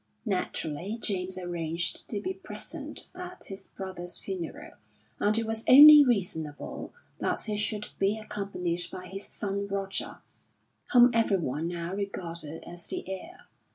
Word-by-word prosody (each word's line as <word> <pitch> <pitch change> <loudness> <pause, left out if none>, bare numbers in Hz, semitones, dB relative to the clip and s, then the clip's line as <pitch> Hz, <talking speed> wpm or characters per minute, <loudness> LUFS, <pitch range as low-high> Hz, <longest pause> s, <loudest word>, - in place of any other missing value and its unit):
Naturally 185 -1 -2
James 185 -3 +1
arranged 175 -1 -3
to 210 - -2
be 375 - -3
present - - -7
at 360 0 -8
his 195 0 -8
brother's 185 -2 -7
funeral 185 -4 -6 0.5
and 210 +2 +3
it 225 - +1
was 225 0 0
only 295 +2 +11
reasonable 175 - -2 0.3
that - - 0
he 215 -1 -2
should 210 0 -2
be 195 +2 +2
accompanied 195 -5 -3
by 185 - -7
his 195 +2 -5
son 200 0 -3
Roger, 195 -1 -3 0.7
whom 245 0 +8
everyone 170 - +1
now 170 +1 -3
regarded 170 -6 -5
as 175 0 -6
the - - -5
heir. 260 - -7
195 Hz, 135 wpm, -29 LUFS, 175-215 Hz, 0.7 s, only